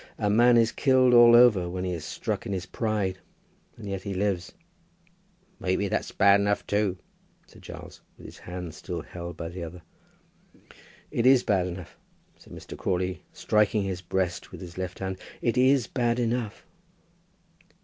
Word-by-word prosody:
A 105 -2 0
man 120 +3 +5
is 115 0 +3
killed 130 -2 +3
all 120 -1 +8
over 110 -8 +5
when 90 +1 -4
he 90 -1 -2
is 85 -3 -5
struck - - -4
in 100 - -3
his 95 -2 -3
pride; 105 -5 -2 0.6
and 110 -3 -9
yet 95 -1 -4
he 100 0 -5
lives." 95 -2 -1 1.1
"Maybe 95 +2 0
that's - - -2
bad 100 0 +5
enough 100 0 0
too," 100 -2 0 0.5
said - - -18
Giles, - - -11 0.2
with - - -14
his - - -11
hand 90 -2 -7
still - - -6
held 85 -1 -8
by 85 - -5
the 90 0 -7
other. 85 +1 -9 1.3
"It 115 - +1
is 130 -2 +6
bad 95 -3 +1
enough," 90 -1 -9 0.4
said - - -19
Mr. - - -9
Crawley, 90 -3 -2
striking 105 0 +1
his 95 -2 -4
breast 90 0 -2
with - - -9
his 90 -2 -9
left 95 -1 -5
hand. 95 -1 -4 0.2
"It 120 - 0
is 130 -1 +4
bad 120 -2 0
enough." 120 -2 -2
100 Hz, 170 wpm, -26 LUFS, 90-115 Hz, 1.3 s, all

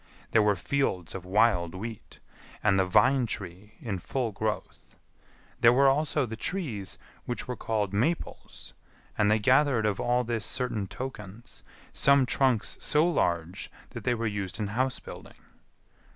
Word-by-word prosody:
There 115 - +5
were 105 -1 +3
fields 95 - -1
of 95 -2 -7
wild 95 -4 +2
wheat, 110 +3 -8 0.5
and 100 -2 +3
the 95 - +3
vine 120 +7 +4
tree 100 0 -7
in 100 -5 -4
full 120 +5 -2
growth. 105 +1 -4 0.6
There 115 - +7
were 135 +3 +5
also 145 +1 +2
the 115 -1 -6
trees 110 - -3 0.3
which 120 - -4
were 125 - -3
called 105 -4 -2
maples; 135 +12 -3 0.4
and 105 -1 +2
they 110 - +4
gathered 125 +1 +3
of 105 -2 0
all 125 +1 +1
this 115 -2 -2
certain 115 -7 -2
tokens; 120 -3 -8 0.3
some 140 -1 +4
trunks 125 -3 +1
so 155 +2 +3
large 85 - -1 0.2
that - - -7
they 125 -1 +1
were 115 0 -3
used 100 -2 -3
in 105 -2 -2
house 130 +4 -1
building. - - -11
110 Hz, 150 wpm, -28 LUFS, 100-130 Hz, 0.6 s, There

